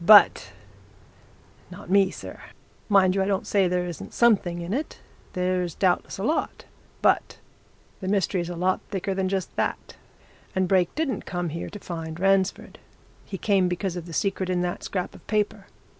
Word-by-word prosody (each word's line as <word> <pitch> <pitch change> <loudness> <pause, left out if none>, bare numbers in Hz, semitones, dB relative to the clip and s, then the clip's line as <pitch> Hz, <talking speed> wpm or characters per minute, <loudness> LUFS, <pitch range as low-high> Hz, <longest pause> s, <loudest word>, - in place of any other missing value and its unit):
"But 175 - +7 1.2
not - - -11
me, 195 -1 +5
sir! - - -9 0.5
Mind 190 -2 +5
you, 195 - +1
I 190 - +1
don't 195 -1 0
say 195 -2 +3
there 180 0 0
isn't 175 -2 -7
something 195 -7 +3
in 170 +3 -4
it 290 +6 -3 0.4
there's 180 -2 0
doubtless 185 -2 +1
a 195 - -4
lot. 305 +8 -1 0.4
But - - +2 0.6
the 185 - -5
mystery's 190 -3 +1
a 175 - -4
lot 185 +2 +1
thicker 195 -1 -2
than 190 -1 0
just 190 -1 -2
that. - - -2 0.6
And 185 -1 +2
Brake 180 -2 +2
didn't 305 -4 -2
come 175 -2 -2
here 165 +2 -5
to 205 - -8
find 165 -4 -6
Ransford. 195 0 +1 0.5
He 195 - -5
came 195 -2 +2
because 180 +1 -2
of 175 -1 -6
the - - -8
secret 190 +2 -1
in 180 -1 +1
that 175 0 -3
scrap 185 -2 -3
of - - -16
paper. 210 -1 -1
185 Hz, 175 wpm, -25 LUFS, 175-195 Hz, 1.2 s, But